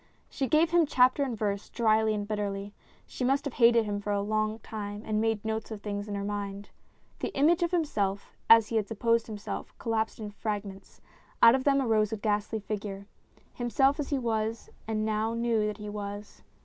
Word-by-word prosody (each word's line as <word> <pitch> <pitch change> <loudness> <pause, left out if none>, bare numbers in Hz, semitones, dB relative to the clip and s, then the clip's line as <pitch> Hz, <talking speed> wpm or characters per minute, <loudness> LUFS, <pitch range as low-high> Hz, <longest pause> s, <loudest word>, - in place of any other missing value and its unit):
She 270 - -1
gave 320 +4 +3
him 345 -3 +4
chapter 255 +1 +4
and 255 -5 -1
verse, 200 -1 -2
drily 220 -2 +2
and 205 -1 -3
bitterly 205 -1 -3 0.3
she - - -6
must 270 +3 +1
have 285 - -3
hated 230 -2 +5
him 205 -1 -3
for 205 - -6
a 205 - +1
long 215 +1 0
time 205 -1 -6
and 215 0 0
made 225 -1 0
notes 220 0 -3
of 215 -2 -7
things 205 0 -4
in 205 - -4
her 200 - -3
mind. 200 0 -5 0.5
The - - -2
image 320 +5 +4
of 345 - +2
himself 210 - -1
as 225 -1 +7
he 230 - 0
had 210 -2 0
supposed 230 +1 +1
himself, 210 -2 -6
collapsed 220 -1 -1
in 210 -1 -6
fragments; 205 -2 -6 0.4
out 230 - +10
of 260 0 0
them 275 -1 +4
arose 220 -5 +2
a 220 - -2
ghastly 210 +1 -1
figure 200 -1 -5 0.5
himself 270 +4 +2
as 290 - -2
he 280 - +1
was 225 -2 -2 0.2
and 215 -1 -1
now 220 +1 0
knew 230 -2 +1
that 210 -1 -4
he 210 -1 -8
was. 205 0 -7
215 Hz, 200 wpm, -29 LUFS, 205-235 Hz, 0.5 s, out